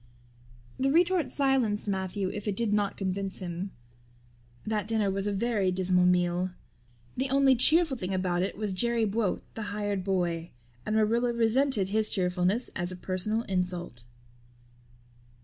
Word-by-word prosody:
The 270 +1 +2
retort 345 +3 +2
silenced 260 -7 +1
Matthew 190 0 -2
if 210 +2 -6
it 205 - 0
did 230 -3 +1
not 205 -1 0
convince 195 0 -3
him. 180 +1 -5 1.0
That 215 -2 -1
dinner 215 -3 +1
was 195 +1 -2
a - - +1
very 200 -2 +1
dismal 180 -1 +2
meal. 180 0 +2 0.7
The 265 +1 -1
only 270 0 +4
cheerful 310 +3 +4
thing 185 -3 -4
about 185 -2 0
it 190 - -2
was 210 -2 -2
Jerry 235 +3 +1
Buote, 210 -2 0
the 225 - -6
hired 205 -2 -2
boy, 175 -3 -1 0.3
and 215 - 0
Marilla 230 +3 +2
resented 235 -2 +2
his 215 +1 +1
cheerfulness 185 +4 0
as 175 0 -1
a - - -5
personal 190 +5 -2
insult. 180 - -3
200 Hz, 150 wpm, -28 LUFS, 185-230 Hz, 1.0 s, only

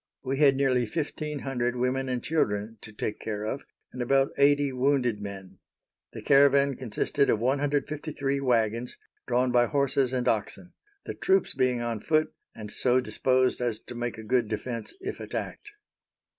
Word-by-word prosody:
We 135 0 -2
had 140 -3 +5
nearly 130 -3 +2
fifteen 150 +1 -3
hundred 125 -2 -1
women 130 +2 -1
and 125 -1 -2
children 110 -8 -1
to 110 - -9
take 105 0 -4
care 105 -1 -4
of, 110 +6 -3 0.3
and 125 - -5
about 135 +2 +2
eighty 145 0 +4
wounded 125 -4 +1
men. 100 -2 -8 0.5
The - - -8
caravan 140 0 +5
consisted 130 +4 0
of - - +3
153 140 +2 -1
wagons, 120 -2 0 0.3
drawn 125 +1 +2
by 120 -1 +4
horses 140 -1 +1
and 125 -1 -1
oxen; 110 - -2 0.3
the - - -4
troops 385 +1 +1
being 130 -2 +1
on 115 -2 -2
foot, 155 +6 +1 0.2
and 105 -1 -8
so 125 +3 +2
disposed 130 +2 +1
as 120 -3 -1
to - - -10
make 120 -1 -4
a 110 - -8
good 120 +1 +1
defense 115 +2 -4
if - - -5
attacked. - - -6
125 Hz, 160 wpm, -27 LUFS, 115-140 Hz, 0.5 s, had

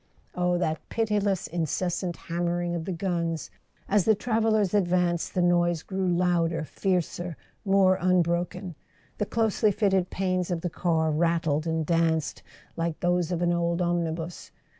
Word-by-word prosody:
Oh, 180 0 +1
that 160 -3 -1
pitiless 205 -4 0
incessant 175 +2 -2
hammering 175 0 -2
of 165 -2 -3
the 190 - -3
guns! 170 -3 -2 0.4
As 200 -2 +2
the 220 - +5
travellers 220 -3 +1
advanced 180 -3 +1
the 180 - +2
noise 175 -2 +2
grew 190 -1 -2
louder, 170 -2 +1
fiercer, 175 -1 -2 0.3
more 195 -2 +4
unbroken; 180 0 +1 0.5
the 210 - 0
closely 220 -2 +2
fitted 190 -3 +1
panes 185 -2 -1
of 175 -2 -2
the 175 - -3
car 160 -3 +1
rattled 160 -1 +1
and 160 -1 0
danced 165 -1 +1 0.3
like 165 -1 -2
those 175 -1 +1
of 175 0 -1
an 175 0 +2
old 170 0 0
omnibus. 170 -1 -2
175 Hz, 140 wpm, -27 LUFS, 170-185 Hz, 0.5 s, the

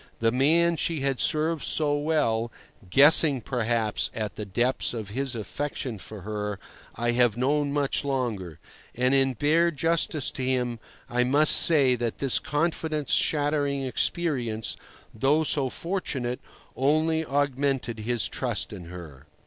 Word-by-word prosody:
The 115 0 +1
man 165 +7 +2
she 160 -3 -1
had 135 -2 -1
served 155 +1 +1
so 150 -2 +1
well 145 -7 0 0.4
(guessing, 145 - +6
perhaps, 115 -2 -1
at 110 -2 -3
the 105 - -6
depths 120 +5 0
of 110 -3 -5
his 130 +3 -2
affection 120 +1 -4
for 105 +2 -10
her) 105 0 -4 0.4
I 120 +1 0
have 120 -2 +2
known 145 +3 0
much 145 -1 0
longer, 115 - -3 0.4
and 125 +2 +1
in 135 -1 +3
bare 155 +7 +2
justice 165 -2 0
to - - -6
him 125 -2 -1 0.3
I 125 +1 +1
must 145 +5 +6
say 140 -6 +5
that 120 -1 -3
this 135 -3 0
confidence 155 -1 -2
shattering 145 -2 +1
experience 125 -5 -1 0.4
(though 140 +8 +2
so 140 -3 0
fortunate) 130 -8 -3 0.4
only 155 +4 +1
augmented 135 -5 -1
his 115 -1 0
trust - - -3
in 90 - -9
her. 80 -5 -11
135 Hz, 140 wpm, -26 LUFS, 115-150 Hz, 0.4 s, guessing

